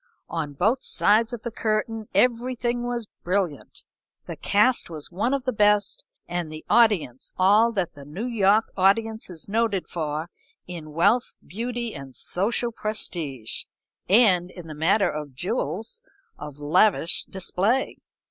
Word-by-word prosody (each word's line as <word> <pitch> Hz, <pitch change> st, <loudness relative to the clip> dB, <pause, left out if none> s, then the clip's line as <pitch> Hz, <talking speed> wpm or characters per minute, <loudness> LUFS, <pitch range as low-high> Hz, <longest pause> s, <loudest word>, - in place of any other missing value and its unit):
On 155 Hz, -4 st, -3 dB
both 220 Hz, -, +1 dB
sides 220 Hz, +3 st, +3 dB
of 240 Hz, -2 st, -6 dB
the 235 Hz, -, -4 dB
curtain 220 Hz, 0 st, -2 dB
everything 245 Hz, 0 st, +1 dB
was 240 Hz, -1 st, -3 dB, 0.2 s
brilliant. 180 Hz, -5 st, -2 dB, 0.4 s
The -, -, -6 dB
cast 215 Hz, +3 st, +2 dB
was 155 Hz, -2 st, -7 dB
one 210 Hz, +8 st, 0 dB
of 275 Hz, -2 st, 0 dB
the 255 Hz, -, -1 dB
best 205 Hz, -1 st, +2 dB, 0.2 s
and 175 Hz, -2 st, -3 dB
the 155 Hz, 0 st, -9 dB
audience 200 Hz, -, +2 dB
all 210 Hz, +5 st, +5 dB
that 190 Hz, -5 st, -1 dB
the 140 Hz, -, -12 dB
New 155 Hz, -, -6 dB
York 220 Hz, -2 st, +3 dB
audience 220 Hz, +4 st, +2 dB
is 165 Hz, -3 st, -9 dB
noted 215 Hz, -2 st, 0 dB
for 155 Hz, 0 st, -4 dB, 0.3 s
in 160 Hz, -4 st, -8 dB
wealth, 225 Hz, +10 st, +2 dB
beauty, 235 Hz, +3 st, -4 dB
and 135 Hz, -2 st, -9 dB
social 230 Hz, -, -1 dB
prestige, 165 Hz, -, -3 dB, 0.4 s
and, 190 Hz, -4 st, +5 dB
in 175 Hz, -2 st, -11 dB
the 155 Hz, -, -8 dB
matter 180 Hz, +6 st, +3 dB
of 150 Hz, -3 st, -6 dB
jewels, 195 Hz, -, -3 dB, 0.3 s
of 150 Hz, -1 st, -9 dB
lavish 170 Hz, +4 st, +2 dB
display. 195 Hz, +6 st, 0 dB
200 Hz, 140 wpm, -25 LUFS, 165-230 Hz, 0.4 s, all